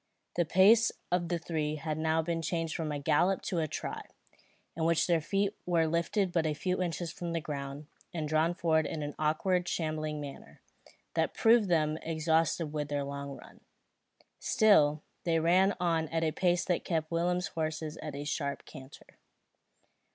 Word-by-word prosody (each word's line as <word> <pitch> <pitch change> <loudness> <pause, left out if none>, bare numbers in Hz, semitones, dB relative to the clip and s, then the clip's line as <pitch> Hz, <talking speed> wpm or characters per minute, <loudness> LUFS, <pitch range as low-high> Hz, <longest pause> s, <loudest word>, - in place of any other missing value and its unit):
The 175 - +2
pace 205 +7 +5 0.2
of 175 -1 +1
the 175 - +1
three 155 -2 -2
had 155 0 -3
now 160 +1 +1
been 165 0 -2
changed 165 0 -2
from 160 -2 -2
a 145 - -2
gallop 165 +7 +2
to 175 - -1
a 155 - 0
trot, - - -5 0.7
in 160 - -2
which 165 0 +3
their 170 -2 +2
feet 200 +5 0
were 170 -2 +3
lifted 170 +4 0
but 165 -2 +1
a 150 - -1
few 185 +4 -1
inches 170 -1 -2
from 170 -1 -4
the 165 - 0
ground, 140 -1 -6 0.3
and 160 -3 -3
drawn 155 +3 +2
forward 160 -3 +2
in 155 -2 -4
an 145 0 -4
awkward 175 +4 +1
shambling 155 -3 -2
manner, 145 -2 -9 0.5
that - - 0
proved 225 -3 +4
them 155 -2 +2
exhausted 160 0 0
with 150 -1 -2
their 145 -1 -1
long 140 0 -6
run. - - -15 0.8
Still, 150 -9 +4 0.2
they 165 -1 +2
ran 185 +4 +4
on 165 -2 +1
at 165 0 -1
a 160 - +1
pace 180 +1 +1
that 175 -2 0
kept 160 -2 -2
Willem's 175 +2 0
horse 155 0 -3 0.2
at 150 -2 -6
a 145 - -4
sharp 145 -1 -3
canter. 130 +1 -13
160 Hz, 175 wpm, -31 LUFS, 155-175 Hz, 0.8 s, pace